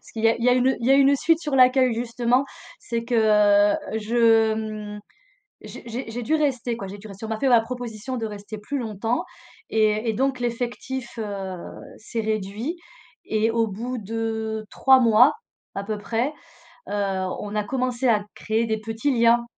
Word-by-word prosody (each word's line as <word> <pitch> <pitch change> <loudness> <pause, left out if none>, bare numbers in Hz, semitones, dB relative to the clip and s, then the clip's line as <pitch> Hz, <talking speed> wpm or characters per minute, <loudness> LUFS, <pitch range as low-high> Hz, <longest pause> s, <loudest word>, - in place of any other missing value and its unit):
parce - - -17
qu'il 220 - -5
y 225 - +7
a 230 - +3
il 235 - -4
y - - +5
a - - +6
une 255 +1 +3
il 235 - -2
y - - +4
a - - +7
une 275 0 +5
suite 315 +3 +2
sur 300 -4 -3
l'accueil, 255 -1 +5
justement, 240 +2 +1 0.4
c'est 230 0 -3
que 240 0 -2 0.9
je, 225 0 +3
mmh, 215 -1 -5 0.6
j'ai - - -10
j'ai 235 +1 -5
j'ai 240 +2 -5
dû 275 +7 0
rester, 255 -6 0
quoi, 200 - -6
j'ai 195 +2 -8
dû 210 +2 -11
rester. 200 +2 -8
On - - -9
m'a 220 - -2
fait 275 - +2
ma 240 -2 +6
proposition 245 +1 -6
de 225 -2 -2
rester 210 0 -8
plus 275 +7 -4
longtemps 225 +1 -2 0.4
et 215 +1 +1
et - - +2
donc 265 +4 0
l'effectif, 240 +1 -4
heu, 200 -4 -4 0.4
s'est 225 +1 -5
réduit 215 - -3 0.5
et 220 +1 +1
au 230 0 +1
bout 235 +5 -4
de 220 0 -3
3 265 -1 +5
mois, 235 +3 +6 0.4
à 200 - -3
peu 215 +1 -3
près, 230 +7 -1 0.6
heu, - - -5 0.5
on 205 0 -6
a 210 -1 0
commencé 255 +2 -1
à 210 -3 +3
créer 225 +1 -1
des 220 -1 -1
petits 225 +5 -1
liens. 235 +1 +4
230 Hz, 195 wpm, -24 LUFS, 215-250 Hz, 0.9 s, y